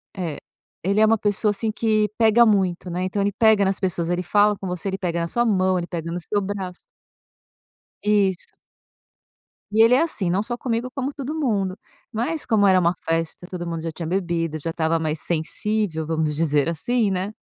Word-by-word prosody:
É. 170 -6 -4 0.5
Ele 200 +3 +1
é - - +7
uma 225 +1 +4
pessoa, 205 +1 +1
assim, 215 +2 -1
que 215 -2 +1
pega 230 +1 +5
muito, 190 -4 +1
né, 180 +2 -2
então 200 +2 -1
ele 200 +1 +1
pega 220 -1 +4
nas 190 0 0
pessoas, 175 -3 -1
ele 175 +1 0
fala 205 +2 +3
com 190 - -6
você, 180 +2 -3
ele 190 - -3
pega 170 -3 -2
na 170 - -1
sua 240 +5 +1
mão, 185 -3 +2
ele 175 0 -3
pega 165 -1 -5
no 175 - -3
seu 205 +4 -1
braço. 190 -2 -5 1.2
Isso. 200 -3 +1 1.2
E 220 +1 +4
ele 235 +2 +5
é 280 - +4
assim, 215 - -1
não 195 +4 +1
só 240 +1 -4
comigo 245 0 -2
como 275 +1 -3
todo 280 +1 -5
mundo, 200 -9 0 0.3
mas 245 +8 -2
como 205 -3 +3
era 185 -1 +5
uma 170 0 +2
festa, 165 +2 -2
todo 180 -2 -5
mundo 165 -1 -3
já 165 0 -4
tinha 165 +1 -6
bebido, 170 -3 -1
já 165 - -4
estava 165 0 0
mais 155 -1 -2
sensível, 170 +1 -2
vamos 155 -2 -1
dizer 150 -1 +2
assim, 215 +7 0
né? 190 +3 -2
190 Hz, 200 wpm, -23 LUFS, 170-215 Hz, 1.2 s, é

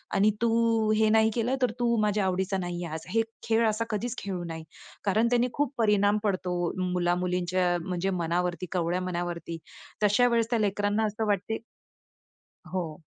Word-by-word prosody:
आणि 205 +2 +4
तू 230 -1 +2
हे 220 0 +4
नाही 220 0 +5
केलं 245 +2 +1
तर 250 -3 +3
तू 235 -1 +2
माझ्या 210 -1 +1
आवडीचा 190 +1 0
नाही 175 -1 -3
आज." 160 -1 -6
हे 225 - +3 0.2
खेळ 225 0 +2
असा 215 +1 0
कधीच 225 +3 -2
खेळू 185 -3 -4
नाही. 165 -1 -6 0.4
कारण 215 +3 +2
त्याने 245 0 +3
खूप 290 -2 0
परिणाम 210 -2 +3
पडतो 185 -3 -1 0.4
मुला-मुलींच्या 180 0 +1
म्हणजे 185 +1 -1
मनावरती, 175 0 -1
कवळ्या 175 0 0
मनावरती. 175 -2 -3 0.5
तशा 210 +4 +5
वेळेस 230 -1 +1
त्या 235 - +1
लेकरांना 205 +1 +1
असं 215 +1 -2
वाटते 205 +2 0 1.2
हो. 170 -4 -4
200 Hz, 155 wpm, -28 LUFS, 180-225 Hz, 1.2 s, नाही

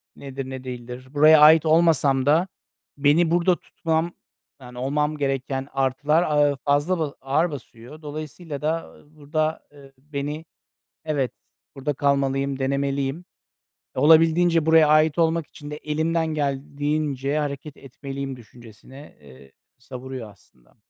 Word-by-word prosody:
nedir, 135 -1 -7
ne 130 -1 -7
değildir? 125 0 -8
Buraya 155 +1 +7
ait 160 +1 +7
olmasam 155 -5 +3
da 160 +6 +3 0.5
beni 155 +4 +3
burada 175 +1 +3
tutmam 165 +1 -2 0.5
yani, 125 -1 -12
olmam 150 +4 -1
gereken 135 -1 -2
artılar, 140 +5 +1
aaa, 145 -2 +2
fazla, 145 +5 +1
ba 150 -3 -2
ağır 155 +6 +1
basıyor. 130 +1 -11
Dolayısıyla 150 0 -7
da, 160 +2 -1
ııı, 150 +1 -22
burada, 155 +1 -2
ııı, 135 -1 -16
beni, 150 +3 -5 0.6
evet, 145 -5 -1 0.4
burada 145 +1 -2
kalmalıyım, 140 0 0
denemeliyim. 140 +3 -1 0.7
Olabildiğince 165 +3 +4
buraya 160 -1 +6
ait 155 +1 +3
olmak 165 -2 +1
için 145 0 -11
de 150 - -5
elimden 160 +2 -1
geldiğince 145 -1 -2
hareket 145 0 -4
etmeliyim 135 0 -7
düşüncesine, 120 - -15
eee, 70 -1 -16 0.3
savuruyor 125 -2 -8
aslında. 65 -10 -25
145 Hz, 125 wpm, -23 LUFS, 135-155 Hz, 0.7 s, Buraya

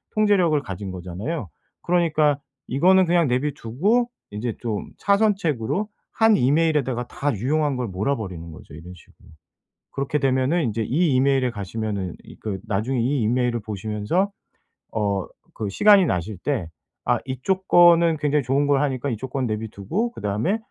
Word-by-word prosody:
통제력을 200 -7 +3
가진 95 -5 -6
거잖아요. 95 - -5 0.3
그러니까 155 -4 +2 0.3
이거는 185 +8 +4
그냥 170 -2 +3
내비두고 145 - 0 0.2
인제 110 +2 -4
좀 110 -4 -4
차선책으로 200 - +1 0.2
한 225 -2 +4
이메일에다가 135 -3 +1
다 145 +1 -2
유용한 145 +6 0
걸 125 -1 -2
몰아버리는 95 -5 -3
거죠 80 - -13
이런 85 +3 -10
식으로. 85 - -20 0.6
그렇게 140 +2 -1
되면은 135 +5 +1
인제 115 -1 -1
이 150 +6 +1
이메일에 130 -1 +2
가시면은 100 -3 -4
이 - - -13
그 100 -3 -4
나중에 110 +5 -1
이 130 +3 +1
이메일을 120 +1 +1
보시면서 110 - -2 0.6
어 100 -3 -1 0.3
그 105 -2 -3
시간이 200 - +6
나실 95 - -2
때 125 - -2 0.4
아 - - +3
이쪽 185 +9 -2
거는 170 -2 +6
굉장히 150 0 +1
좋은 135 +3 +1
걸 140 -1 +3
하니까 140 -1 -1
이쪽 120 +3 -5
거 135 - -2
내버려두고 110 - -2
그다음에 105 - -1
130 Hz, 350 characters per minute, -23 LUFS, 105-165 Hz, 0.6 s, 시간이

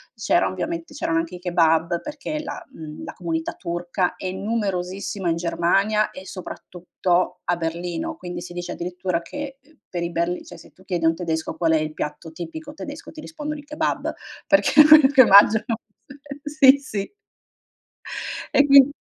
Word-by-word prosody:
c'era - - +2
ovviamente 335 0 -4
c'erano 165 - -1
anche 165 +2 -4
i - - -9
kebab, 170 -1 +2
perché, 300 +1 -5
la, 365 - -6
mhmm, 155 -1 -9
la - - -7
comunità 165 -2 -3
turca 175 +1 -2
è 185 - -4
numerosissima 195 -2 -2
in 165 - +1
Germania, 180 +5 +1
e 185 - -10
soprattutto, 180 -1 -3
a 175 - +1
Berlino. 170 +1 -3
Quindi, 175 -1 -6
si - - -9
dice, 175 0 -5
addirittura, 180 0 -3
che, 275 +8 -7
uhm, 305 +1 -26
per 175 -1 -3
i 170 - -3
berli 170 +2 -1
cioè, - - -11
se 165 - -16
tu 185 - -21
chiedi, 175 -3 -2
a - - +6
un 165 - +3
tedesco: 160 -2 -3
"Qual 165 -2 +1
è 160 - +4
il 155 0 -3
piatto 150 +2 -5
tipico 290 - -8
tedesco?", 295 0 -8
ti 310 - -10
rispondono: 300 -1 -6
"Il 290 - -13
kebab" 300 +1 -2 0.3
perché 295 -1 +5
è - - +8
quello 305 -2 +9
che 270 -2 +7
mangiano 220 +4 +6 0.7
sì, 290 -2 +6
sì. 210 - -5 1.4
E 285 - +5
quin 275 -1 +8
185 Hz, 175 wpm, -23 LUFS, 170-275 Hz, 1.4 s, quello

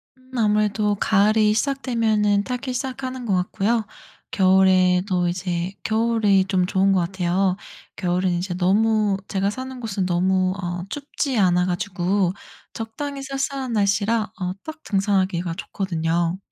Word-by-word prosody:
음 260 0 -25
아무래도 210 -1 +2
가을이 210 +1 +3
시작되면 220 -6 +1
타기 255 +2 -4
시작하는 260 -1 -4
것 205 - 0
같고요. 205 +5 0 0.5
겨울에도 185 -1 +3
이제 175 0 -2
겨울이 220 -3 +2
좀 190 -1 +1
좋은 195 +1 +2
것 190 - +3
같아요. 180 +1 0 0.4
겨울은 180 0 0
이제 175 +1 -2
너무 205 +2 +2
제가 195 0 0
사는 260 +3 -6
곳은 205 -5 -2
너무 185 +1 +1
어 175 0 -3
춥지 280 -1 -3
않아 180 -2 +3
가지고 185 0 0 0.4
적당히 275 +6 -5
쌀쌀한 270 -2 -3
날씨라 210 +1 +1
어 180 0 -1
딱 315 0 -8
등산하기가 190 -4 0
좋거든요. 170 -2 -2
200 Hz, 295 characters per minute, -22 LUFS, 185-225 Hz, 0.5 s, 가을이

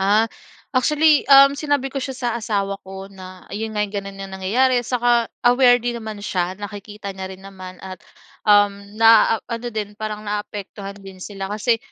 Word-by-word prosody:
Ah, 210 +3 +3 0.4
actually, 300 +3 +3
um, 275 0 +8
sinabi 285 -3 0
ko 275 - -2
siya 265 0 -4
sa 245 -2 -2
asawa 200 -3 -2
ko, 195 +1 -9
na 185 -1 -12
ayun 220 +1 -4
nga, 210 - +2
ganun 200 -1 -5
na 195 0 -7
nangyayari, 240 +7 +2
saka 240 -2 +2 0.2
aware 245 0 +6
din 240 -1 -2
naman 215 -2 -7
siya. 180 -1 -1
Nakikita 205 0 -8
niya 190 0 -6
rin 190 - -17
naman 185 -2 -10
at, 185 -1 -8 0.5
um, 205 -1 +4
naa-ano 225 +1 +4
din, 210 -1 -3
parang 215 -1 -4
naapektuhan 205 -1 -5
din 195 -1 -12
sila 195 0 -6
kasi 230 +2 +1
210 Hz, 165 wpm, -21 LUFS, 195-240 Hz, 0.5 s, um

